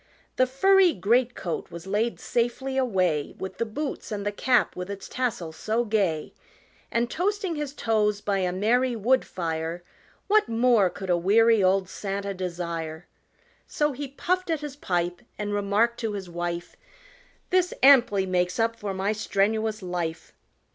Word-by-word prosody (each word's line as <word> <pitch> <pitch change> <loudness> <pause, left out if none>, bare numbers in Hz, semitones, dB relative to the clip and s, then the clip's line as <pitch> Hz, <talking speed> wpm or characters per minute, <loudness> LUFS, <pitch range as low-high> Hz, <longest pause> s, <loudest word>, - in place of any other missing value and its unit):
The 255 - +3
furry 375 +6 +4
great 240 +5 +2
coat 170 -3 -4
was 170 +1 -9
laid 210 +4 -1
safely 245 +3 -1
away 185 - 0
With 190 - -7
the 230 - 0
boots 280 +4 -5
and 205 -1 -3
the 205 - 0
cap 245 +4 +2
with 180 +1 -5
its 200 -1 -6
tassel 230 -10 -2
so 220 +8 -1
gay, 195 -8 0 0.6
And 235 +1 +1
toasting 385 - -1
his 295 -2 -3
toes 210 -4 +1
by 200 -1 -1
a 180 -1 0
merry 240 +7 +1
wood 250 +4 +2
fire, 165 0 -4 0.4
What 425 - +3
more 230 -4 +4
could 190 0 -5
a 175 - +4
weary 220 +4 +4
old 190 0 +3
Santa 200 +1 -4
desire? 170 -3 -4 0.6
So 295 0 0
he 285 +1 -5
puffed 365 +7 -2
at 320 -2 0
his 295 -2 -6
pipe 175 -8 -2 0.2
and 205 0 -3
remarked 205 +4 +1
to 225 -3 -2
his 195 -2 -5
wife, 175 0 -4 0.8
"This 365 -1 +3
amply 240 -8 +6
makes 180 -1 0
up 225 0 +2
for 205 -3 -5
my 195 +2 0
strenuous 215 +1 0
life! 170 -3 -4
210 Hz, 160 wpm, -26 LUFS, 185-250 Hz, 0.8 s, amply